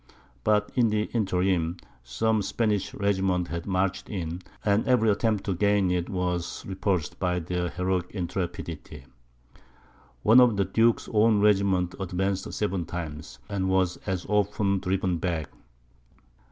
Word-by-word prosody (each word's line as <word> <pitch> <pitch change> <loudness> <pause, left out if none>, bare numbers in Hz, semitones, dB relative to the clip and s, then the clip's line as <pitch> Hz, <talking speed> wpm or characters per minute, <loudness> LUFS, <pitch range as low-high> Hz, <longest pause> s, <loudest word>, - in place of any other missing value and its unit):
But 105 -1 +2
in 120 -3 +3
the 105 0 +1
interim, 90 -5 +1 0.3
some 105 - 0
Spanish 105 -1 0
regiments 95 -3 0
had 85 +1 -4
marched 95 0 -1
in, 90 -3 -4 0.2
and 105 +1 +3
every 120 -4 +4
attempt 105 -1 0
to 95 - -1
gain 100 0 +2
it 90 -1 -1
was 90 -2 -2
repulsed 95 -4 -2
by 90 -1 0
their 90 +1 -2
heroic 90 0 -1
intrepidity. 85 -6 -5 1.2
One 115 +4 +7
of 120 -5 +4
the 100 - +2
duke's 115 +4 +2
own 110 0 +4
regiments 95 -3 +2
advanced 95 +1 -2
seven 100 -4 -1
times, 80 -3 -6
and 95 -2 -1
was 95 -2 +1
as 95 -3 -4
often 100 -1 +1
driven 95 -1 0
back. 80 -3 -2
95 Hz, 135 wpm, -27 LUFS, 90-105 Hz, 1.2 s, One